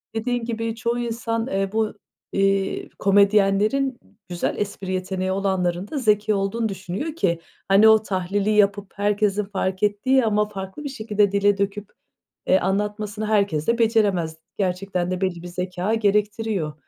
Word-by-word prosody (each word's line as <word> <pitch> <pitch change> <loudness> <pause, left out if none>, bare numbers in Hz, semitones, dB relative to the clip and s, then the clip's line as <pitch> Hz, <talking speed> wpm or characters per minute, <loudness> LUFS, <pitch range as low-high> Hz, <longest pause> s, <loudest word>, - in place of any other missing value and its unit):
Dediğin 240 +1 -1
gibi 225 -1 -3
çoğu 235 +1 -1
insan, 230 0 -2
eee, 195 -4 -1
bu, 220 -1 0 0.4
eee, 195 0 0
komedyenlerin 205 +6 +3 0.3
güzel 175 -1 -2
espri 200 -2 -4
yeteneği 185 0 -2
olanların 190 -1 -1
da 310 - -5
zeki 215 -4 +2
olduğunu 205 +3 -1
düşünüyor 195 - -5
ki 170 - 0 0.3
hani 200 +3 +6
o 220 0 +6
tahlili 195 +1 -1
yapıp 205 -1 +2
herkesin 205 0 +1
fark 190 -1 -3
ettiği 230 +5 +2
ama 210 -1 +2
farklı 190 +6 -7
bir 285 - -4
şekilde 210 -5 0
dile 200 0 +3
döküp, 200 +1 -2 0.6
eee, 190 - +5
anlatmasını 210 +2 -2
herkes 200 -8 +1
de 235 0 +2
beceremez, 200 -8 +2 0.2
gerçekten 185 -1 -1
de 185 - -3
belli 185 -3 -1
bir - - -6
zekâ 180 +3 -2
gerektiriyor. 210 -5 0
205 Hz, 145 wpm, -23 LUFS, 190-220 Hz, 0.6 s, hani